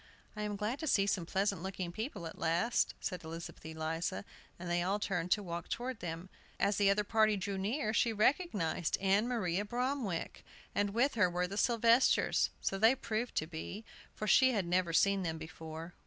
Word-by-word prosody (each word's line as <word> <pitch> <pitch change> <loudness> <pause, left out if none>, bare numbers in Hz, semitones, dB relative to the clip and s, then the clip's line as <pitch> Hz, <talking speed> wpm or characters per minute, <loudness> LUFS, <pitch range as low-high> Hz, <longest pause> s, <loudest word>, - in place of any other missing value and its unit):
"I 210 - -5
am 210 -1 -2
glad 210 +6 -2
to 315 - -4
see 200 -7 +3
some 190 -4 -1
pleasant 195 -1 0
looking 185 -2 -4
people 215 - -5
at 165 - -8
last," 170 +9 +1
said 180 -3 -4
Elizabeth 165 +1 -8
Eliza, 160 +4 -3 0.3
and 175 - -7
they 175 0 +1
all 190 +3 +1
turned 180 -4 -2
to 210 - -2
walk 170 -1 -5
toward 250 -1 -3
them. 165 +1 -5 0.3
As 200 +1 +2
the 200 -1 +4
other 205 +1 +3
party 215 0 +3
drew 195 +1 -3
near 215 +4 -1
she 230 - +3
recognized 210 - +1
Ann 195 +4 +2
Maria 205 -6 0
Bromwick! 240 -5 -2 0.3
And 205 0 +1
with 270 +4 +3
her 205 -5 +3
were 175 +1 0
the 190 +2 -6
Sylvesters, 235 +3 +3
so 195 - -1
they 225 +5 +6
proved 230 -1 -3
to 155 - +1
be, 170 +6 -7 0.3
for 215 - -4
she 260 +5 +5
had 200 -5 0
never 175 0 +1
seen 200 +3 +3
them 165 -3 -2
before. 160 +1 -8
195 Hz, 190 wpm, -33 LUFS, 175-220 Hz, 0.3 s, they